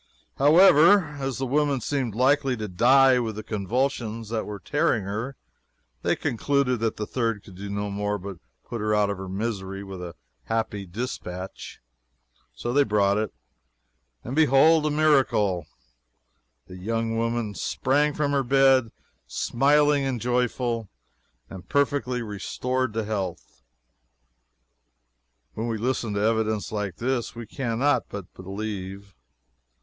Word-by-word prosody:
However, 170 +5 +7 0.2
as 135 -2 -3
the 135 - -2
woman 145 +1 +1
seemed 125 -3 -2
likely 130 +1 +2
to 110 -1 -4
die 130 +7 +5
with 110 -3 -3
the 110 - -6
convulsions 115 +1 -2
that 115 -1 -2
were 105 -1 -5
tearing 115 +1 0
her, 110 +8 -4 0.6
they - - +1
concluded 125 +1 0
that 115 0 -1
the 105 - -3
third 115 -3 -2
could 95 - -13
do 100 +2 -7
no 100 0 -3
more 105 +1 -1
than 95 -2 -8 0.3
put 120 -2 -5
her 105 0 +1
out 105 -1 +2
of 100 - -4
her 95 -1 -6
misery 95 -1 -4
with 95 -2 -8
a 90 -1 -7 0.3
happy 110 -3 -2
dispatch. 95 -3 -6 0.7
So 120 - -3
they 145 +1 +5
brought 105 -3 +2
it, 110 - -2 0.9
and 125 - -5
behold, 155 +1 +5
a - - +1
miracle! 130 - +2 1.0
The 90 0 -11
woman 115 -1 -1
sprang 145 +7 0
from 145 -1 0
her 140 -1 +2
bed, 135 -2 +4 0.4
smiling 145 +2 +2
and 130 -3 -1
joyful, 120 -2 -1 0.6
and 95 -2 -11
perfectly 140 -4 0
restored 125 +4 -2
to 110 -1 -2
health. 90 - -5 1.9
When 115 +2 -3
we 115 -1 -2
listen 115 -2 -1
to 100 - 0
evidence 110 -1 0
like 105 -4 -3
this, 125 -1 -2
we 120 0 -7
cannot 125 +2 0
but 100 -3 -8
believe. 100 0 -6
115 Hz, 135 wpm, -25 LUFS, 100-135 Hz, 1.9 s, However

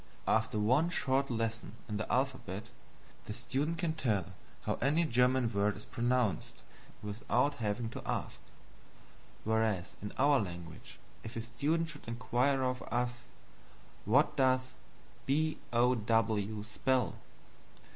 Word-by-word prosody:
After 110 -1 +2
one 130 +11 +3
short 135 -5 +1
lesson 115 -2 -2
in 105 -2 -2
the 110 - -3
alphabet, 120 -5 -1 0.5
the 105 - -5
student 135 +7 -1
can 160 -1 0
tell 105 -10 -1 0.3
how - - -1
any 155 +6 +3
German 125 -3 +3
word 100 +1 +1
is 105 - -10
pronounced 120 -7 0 0.4
without 120 +7 0
having 110 +1 -1
to - - -6
ask; - - -3 1.0
whereas 110 -4 0
in 105 - -5
our 140 0 +5
language 85 -4 -7 0.3
if 110 - -7
a 115 - -2
student 150 +8 0
should 150 -6 -10
inquire 125 +3 +1
of 125 0 0
us, 120 0 -1 0.8
"What - - +4
does 130 -1 +2 0.5
B, 155 +3 +1
O, 120 +1 +4
W, 110 -2 +1
spell?" 125 0 0
120 Hz, 125 wpm, -33 LUFS, 110-130 Hz, 1.0 s, our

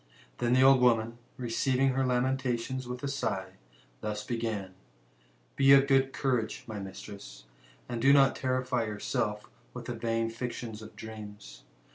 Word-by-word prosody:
Then 120 0 +2
the 130 +1 +5
old 135 -1 +7
woman, 115 -1 +2 0.2
receiving 130 +2 +1
her 135 +1 +1
lamentations 130 0 0
wtdi 125 +1 -6
a - - -1
sigh, 100 -9 -2 0.5
thus 105 -1 -4
began: 110 -5 -3 0.4
*' - - -35
Be 135 0 +6
of 135 0 +7
good 135 -1 +3
courage, 125 -5 -1
my 110 -2 -6
mistress^ 95 - -9 0.4
and 120 -2 -4
do 135 +3 +6
not 135 -1 +6
terrify 130 -2 0
yourself 105 0 -2 0.3
with 125 -1 -7
the 120 - -3
vain 115 0 -1
fictions 115 -2 -5
<^ 110 - -11
dreams. 105 - -10
120 Hz, 150 wpm, -30 LUFS, 105-130 Hz, 0.5 s, old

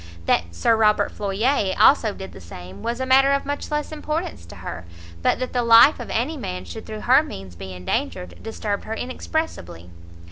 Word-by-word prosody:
That 85 -1 +1
Sir 85 - +3
Robert 215 -1 +3
Floyer 205 +1 0
also 235 -6 +5
did 190 -1 -9
the - - -12
same 90 +2 -10
was 235 +1 -3
a 260 - -1
matter 270 +1 +5
of 280 - 0
much 285 +1 -4
less 300 0 -2
importance 305 - -4
to - - -11
her, - - -7 0.4
but - - +2
that 255 - -4
the 250 - +1
life 235 +5 +7
of 240 - -7
any 265 +8 -1
man 90 - -5
should 85 - -9
through 215 -1 -6
her 260 +4 +5
means 95 - -9
be 95 +2 -9
endangered, 180 - -4
disturbed 215 -2 -4
her 220 - -4
inexpressibly. 225 - -4
225 Hz, 190 wpm, -23 LUFS, -, 0.4 s, life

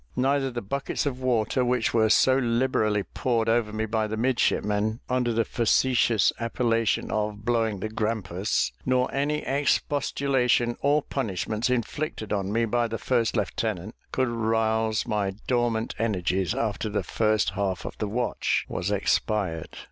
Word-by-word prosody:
Neither 135 +1 +1
the 120 -1 -5
buckets 140 +9 -2
of 130 -2 -3
water 125 0 +1
which 125 -2 +1
were 110 -2 +3
so 130 +4 +5
liberally 115 -4 +1
poured 115 0 -1
over 115 -1 +2
me 110 +1 -2
by 110 0 -1
the 110 +1 -4
midshipmen, 110 -3 +1
under 125 -1 +1
the 115 0 +1
facetious 120 -2 +2
appellation 115 -2 0
of 105 -1 -2
"blowing 115 -5 0
the 110 - -1
grampus," 105 - -1
nor 130 0 +1
any 150 +2 -1
expostulation 135 -3 +1
or 145 +1 +3
punishments 110 -1 -2
inflicted 120 -2 -2
on 100 -1 -1
me 115 +2 +2
by 120 +1 +1
the 115 0 -4
first 120 -2 0
lieutenant 105 -1 -2 0.2
could 130 0 +1
rouse 110 -1 0
my 105 -4 -1
dormant 120 -2 0
energies 95 -4 0
after 110 -1 -1
the 105 - -1
first 110 -3 +1
half 95 -3 -2
of - - -6
the 105 - -1
watch 120 +4 -1
was 90 - -3
expired. 100 -4 -1
115 Hz, 150 wpm, -26 LUFS, 105-125 Hz, 0.2 s, so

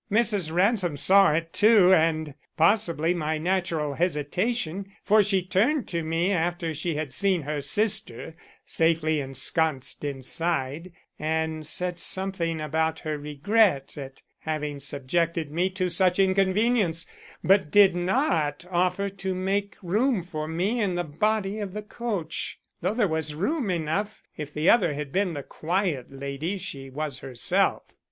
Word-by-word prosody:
Mrs. 205 -6 +2
Ransom 180 -3 +1
saw 195 +2 +5
it 165 +1 -2
too 205 -4 +5
and 160 -3 +1 0.2
possibly 170 -2 +3
my 160 -2 -2
natural 165 -3 -1
hesitation, 180 - -2
for 215 +1 +5
she 195 -2 +1
turned 225 - +1
to 170 -2 -2
me 165 +4 0
after 175 -2 -1
she 160 +2 -3
had 150 -3 -4
seen 190 0 +2
her 150 0 -3
sister 195 - -1 0.3
safely 160 -1 +1
ensconced 135 +2 0
inside, 145 +3 -1 0.3
and 160 0 -2
said 180 +1 0
something 185 -4 0
about 160 +1 -1
her 155 -1 -3
regret 150 +2 +1
at 135 -2 -9 0.2
having 150 -2 -4
subjected 150 +3 -1
me 175 +4 0
to 185 -1 -2
such 180 +1 +2
inconvenience, 195 -2 +2 0.4
but 190 -5 +3
did 195 0 +5
not 175 - 0
offer 180 +2 +1
to 190 -1 -4
make 195 +2 -2
room 210 +3 +1
for 155 -3 -5
me 190 +9 -1
in 190 -4 0
the 175 - -1
body 205 +6 -1
of 200 -3 -5
the 210 0 -5
coach, 210 -7 -4 0.2
though 185 +5 -1
there 225 -4 +2
was 160 -2 -2
room 230 - -1
enough 180 +5 -2
if 150 -1 -7
the 150 +3 -2
other 170 -11 +4
had 145 -1 -5
been 185 -2 0
the 140 - -5
quiet 165 -6 -2
lady 140 +7 -4
she 140 -8 -7
was 140 -1 -4
herself. 125 -3 0
170 Hz, 145 wpm, -25 LUFS, 155-195 Hz, 0.4 s, saw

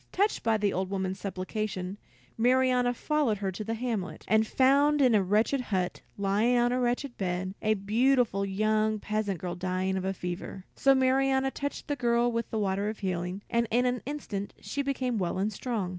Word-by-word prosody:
Touched 405 +3 +1
by 225 -1 +2
the 205 -1 0
old 185 +1 -2
woman's 190 -1 -2
supplication, 195 0 -4 0.4
Marianna 250 +1 +3
followed 290 -6 0
her 195 -1 -2
to 200 +4 -5
the 225 +2 -3
hamlet, 225 -5 -3
and 220 +2 +3
found 280 +4 +4
in 255 -4 +5
a 210 - +5
wretched 215 +8 +2
hut, 185 -7 -2 0.2
lying 205 +5 +2
on 240 0 +3
a 250 - +1
wretched 245 +1 -1
bed, 185 0 -2
a 215 0 +2
beautiful 220 +1 +2
young 215 +2 +1
peasant 210 -2 -2
girl 175 +1 -4
dying 185 +1 -1
of 190 - -2
a 190 - 0
fever. 180 +1 -6
So 275 0 +4
Marianna 265 0 +2
touched 285 +1 -5
the 290 - -1
girl 240 -2 +2
with 230 0 -2
the 220 - -3
water 200 0 0
of 215 - -5
healing, 185 0 -3
and 235 0 +1
in 245 +2 +2
an 250 -1 0
instant 210 -9 -5
she 240 +8 -3
became 260 -4 -1
well 180 -1 -1
and 205 +3 0
strong. 215 -4 -2
215 Hz, 190 wpm, -29 LUFS, 195-250 Hz, 0.4 s, in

